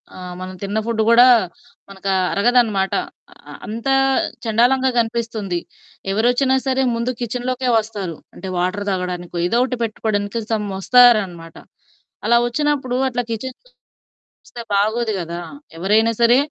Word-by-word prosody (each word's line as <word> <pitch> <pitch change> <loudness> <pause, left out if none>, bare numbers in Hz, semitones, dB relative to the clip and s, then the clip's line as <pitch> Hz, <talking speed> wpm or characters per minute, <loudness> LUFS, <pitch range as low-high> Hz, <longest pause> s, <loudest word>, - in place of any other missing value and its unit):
ఆహ్, 180 -1 -8
మనం 185 0 -6
తిన్న 200 +2 -2
ఫుడ్ 230 -1 -1
గూడా 240 +2 +7 0.6
మనకు 195 0 -6 0.2
అరగదనమాట. 215 -3 +2 0.6
ఆహ్, - - -9
అంత 225 +4 -5 0.6
చెండాలంగా 250 +4 +3
కనిపిస్తుంది. 225 -5 -2 0.5
ఎవరొచ్చినా 245 +5 +2
సరే 265 0 +1
ముందు 235 +2 -1
కిచెన్‌లోకే 250 +2 -2
వస్తారు. 205 -6 -5 0.2
అంటే 190 - -8
వాటర్ 185 +3 -1
తాగడానికో 180 -1 -4
ఏదో 235 +6 +1
ఒకటి 255 -2 -3
పెట్టుకోవడానికి 215 0 -2
సమ్ 210 -1 -1
వస్తారనమాట. 195 -8 +4 0.7
అలా 235 - +4
వచ్చినప్పుడు 270 -1 -1
అట్లా 245 0 -2
కిచెన్ 250 +3 -4 0.9
చూస్తే 235 - -9
బాగోదు 220 +3 +1
గదా! 170 -1 -5 0.4
ఎవరైనా 215 +6 +2
సరే 235 +1 +5
225 Hz, 120 wpm, -20 LUFS, 195-245 Hz, 0.9 s, గూడా